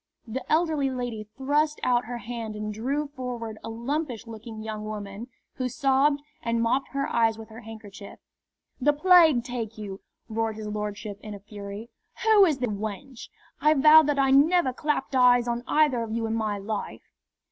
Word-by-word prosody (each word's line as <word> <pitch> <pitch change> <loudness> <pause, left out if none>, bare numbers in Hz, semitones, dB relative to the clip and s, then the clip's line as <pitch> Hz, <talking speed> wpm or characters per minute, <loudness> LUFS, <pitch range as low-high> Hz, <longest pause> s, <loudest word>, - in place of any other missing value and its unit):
The 245 +3 -5
elderly 310 -4 +2
lady 245 -4 -4
thrust 295 +3 +1
out 245 -1 +2
her 240 +1 -5
hand 230 -1 -6
and 210 0 -4
drew 275 +7 -2
forward 245 -5 -6
a - - -5
lumpish 245 +2 -3
looking 220 -1 -9
young 215 -1 -5
woman, 210 +1 -6 0.3
who 255 -1 -1
sobbed 280 +2 +2 0.2
and 230 0 -1
mopped 235 +4 +1
her 275 0 -1
eyes 225 -1 +2
with 225 0 -10
her 220 +1 -10
handkerchief. 215 -3 -11 0.6
"The 295 +3 +3
plague 320 -5 +6
take 235 -3 -5
you!" 200 -2 -7 0.3
roared 225 -1 -2
his 215 0 -7
lordship, 210 -1 -5
in 210 -1 -7
a - - -9
fury. 205 +2 -9 0.3
"Who 435 -3 +7
is 310 -6 +1
the 250 -1 -1
wench? 220 +5 -6 0.3
I 305 +1 +5
vow 305 +3 +8
that 295 -2 0
I 270 -1 +3
never 285 0 +4
clapped 295 0 -2
eyes 245 -1 +5
on 240 0 -2
either 295 -6 +3
of 225 -1 -4
you 225 0 -1
in 225 - -2
my 215 -2 -1
life!" 205 +1 -5
235 Hz, 180 wpm, -26 LUFS, 215-275 Hz, 0.6 s, vow